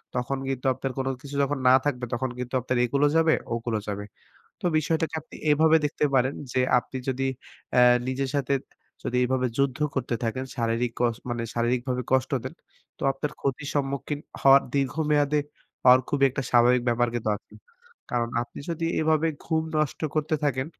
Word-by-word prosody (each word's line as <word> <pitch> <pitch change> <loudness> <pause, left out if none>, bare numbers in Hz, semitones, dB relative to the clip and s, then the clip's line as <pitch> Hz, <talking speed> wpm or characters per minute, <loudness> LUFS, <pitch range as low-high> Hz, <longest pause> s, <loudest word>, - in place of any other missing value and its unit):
তখন 125 +2 -1
কিন্তু 135 -1 -3
আপনার 135 +1 -4
কোন 135 0 -1
কিছু 140 -1 -8
যখন 140 +1 -1
না 125 - +8
থাকবে 125 -4 -1
তখন 130 +2 -1
কিন্তু 125 0 -5
আপনার 130 +1 -1
একুলও 140 +4 +2
যাবে, 165 -1 +4 0.2
ওকুলও 115 -2 -2
যাবে। 105 0 -4 0.6
তো - - -15
বিষয়টাকে 160 +1 -1
আপনি - - -16 0.2
এভাবে 160 +2 +5
দেখতে 150 0 0
পারেন 130 +1 +3 0.2
যে, 130 - +2 0.2
আপনি 130 - -7
যদি 135 +1 0 0.5
অ্যাঁ 125 -1 +6
নিজের 130 +1 -1
সাথে 140 -1 +1 0.5
যদি 125 - -2
এভাবে 130 0 +1
যুদ্ধ 140 0 +1 0.2
করতে 130 -3 -1
থাকেন, 130 +3 -2
শারীরিক 115 0 0
কস 120 -2 +2
মানে 120 -1 -2
শারীরিকভাবে 125 +2 0
কষ্ট 130 0 +2
দেন - - -6 0.4
তো - - -11
আপনার 145 +2 -4
ক্ষতির 140 +1 -2
সম্মুখীন 140 +1 -2 0.2
হওয়ার 135 0 +7
দীর্ঘমেয়াদে 145 +1 +1 0.4
হওয়ার 125 0 +7
খুব 145 - 0
একটা 135 +2 -3
স্বাভাবিক 120 +1 +5
ব্যাপার 120 +1 +2
কিন্তু 110 -2 -1
আছে। - - -22 0.6
কারণ 120 -1 0
আপনি 120 - -10
যদি 165 0 -2
এভাবে 160 0 +2 0.2
ঘুম 160 -1 0
নষ্ট 155 -2 0
করতে 155 +1 0
থাকেন, 130 -2 0
130 Hz, 170 wpm, -26 LUFS, 125-145 Hz, 0.6 s, না